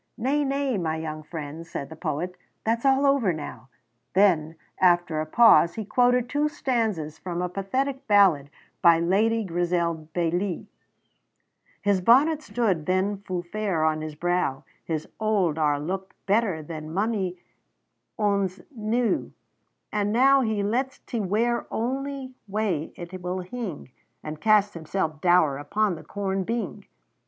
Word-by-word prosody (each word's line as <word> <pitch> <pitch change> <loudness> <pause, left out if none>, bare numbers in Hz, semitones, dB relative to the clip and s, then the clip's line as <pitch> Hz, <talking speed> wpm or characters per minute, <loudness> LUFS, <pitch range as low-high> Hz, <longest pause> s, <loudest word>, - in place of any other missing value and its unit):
"Nay, 275 +5 +1
nay, 275 -5 0
my 160 -2 -1
young 155 -1 -5
friend," 155 0 -7
said 140 -3 -5
the 160 - -9
poet, 165 +2 -3 0.3
"that's 230 +4 +1
all 270 +1 +4
over 275 -9 +3
now." 150 -4 -7 0.5
Then, 165 -5 +3 0.2
after 175 -3 +3
a 155 - -4
pause, 170 -4 +6
he 220 - -4
quoted 245 +2 +3
two 295 +3 +1
stanzas 220 - -2
from 175 -2 -4
a 180 - 0
pathetic 260 +9 -2
ballad 190 -9 +4 0.3
by 170 -1 +6
Lady 215 +6 +2
Grizel 170 -3 -1
Bailie: 175 +2 -1 1.2
"His 200 -2 +2
bonnet 285 - +5
stood 195 - -1
then 190 +2 +1
fu' 185 -3 -4
fair 185 -3 -1
on 155 0 +1
his 155 -1 -6
brow, 175 -5 0 0.2
His 155 -2 -3
auld 200 -8 +1
are 145 -2 +2
looked 190 +5 -4
better 200 -5 +1
than 155 0 -7
mony 195 -1 -1 0.8
ane's 200 -2 +1 0.2
new; 225 +2 0 0.6
But 205 -1 0
now 265 +5 +5
he 220 -4 0
lets 255 +6 -1
't 235 - -5
wear 235 +4 +1
ony 265 +2 -3
way 195 -6 -1
it 180 +1 -8
will 180 +1 -3
hing, 185 - -6 0.3
And 155 0 -7
casts 210 -2 +4
himself 160 -1 -3
doure 175 -6 +4
upon 205 +7 0
the 160 -2 -8
corn 195 +3 -2
bing. 230 +4 -4
190 Hz, 145 wpm, -25 LUFS, 165-225 Hz, 1.2 s, pause